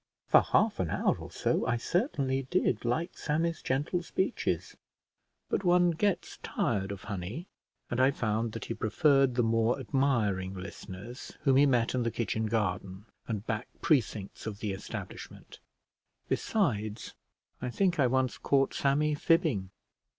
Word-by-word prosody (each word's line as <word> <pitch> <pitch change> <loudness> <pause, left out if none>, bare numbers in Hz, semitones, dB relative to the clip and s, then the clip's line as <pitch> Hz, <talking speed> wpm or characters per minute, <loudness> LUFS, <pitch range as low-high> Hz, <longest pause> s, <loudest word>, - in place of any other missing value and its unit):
For - - +8
half - - +2
an - - 0
hour - - +1
or - - -8
so - - 0
I 120 -1 +2
certainly 135 - 0
did 155 - +1
like 160 +9 -1
Sammy's 165 +2 -1
gentle 145 +7 0
speeches; 190 +5 -1 0.7
but - - -1
one 175 -1 +4
gets 190 +3 -1
tired 95 0 -1
of 100 -2 -7
honey, 100 - -5 0.5
and 120 - 0
I 130 - +6
found 115 -3 -1
that 115 - -5
he - - -3
preferred 135 +3 +3
the 120 - +3
more 115 +3 +2
admiring 110 -8 0
listeners 95 +5 -8
whom 135 -2 +4
he 145 +1 +6
met 120 -3 +2
in 130 - +1
the 115 - +1
kitchen 110 -1 -1
garden 100 -2 -2 0.2
and 110 -2 -3
back 110 -2 -2 0.2
precincts 110 - 0
of 105 -2 -4
the 105 -1 -3
establishment; 95 - -8 0.7
besides, 110 - -1 0.5
I 125 - -2
think 180 +4 +1
I 135 - +5
once 130 0 0
caught 135 -1 +2
Sammy 150 +2 +2
fibbing. 145 - +2
125 Hz, 150 wpm, -30 LUFS, 105-145 Hz, 0.7 s, For